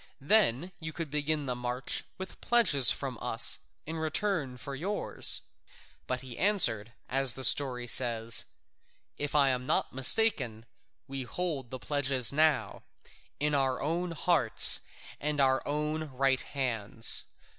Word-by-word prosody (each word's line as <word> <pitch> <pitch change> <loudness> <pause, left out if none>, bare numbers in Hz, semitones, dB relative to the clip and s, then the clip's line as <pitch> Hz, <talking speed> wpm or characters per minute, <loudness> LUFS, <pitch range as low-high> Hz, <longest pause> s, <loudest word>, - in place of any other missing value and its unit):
Then 170 - +1
you 155 -1 -7
could 165 -3 -6
begin 150 0 -2
the 125 - -2
march 125 +1 -3
with 190 0 -9
pledges 190 - +4
from - - -1
us - - +3 0.3
in 160 +2 -6
return 160 -4 -2
for 140 +2 -8
yours." 185 +10 -2 0.7
But 130 -1 -3
he 130 -2 -10
answered, 120 - +3
as 135 -2 +1
the 130 - -7
story 125 -3 +2
says, 115 -2 +2 0.7
"If 145 0 -4
I 140 -2 +4
am 125 -1 -3
not - - -1
mistaken, 130 - +2 0.4
we 135 0 -5
hold 135 0 -5
the 130 - -6
pledges 135 -3 -1
now, 155 -1 +1 0.6
in 150 +1 -1
our 135 -2 0
own 170 +5 -2
hearts 165 -7 +5 0.4
and 150 0 -3
our 130 -1 +2
own 150 +2 -3
right 135 -2 0
hands. 115 -5 -1
140 Hz, 135 wpm, -29 LUFS, 125-155 Hz, 0.7 s, hearts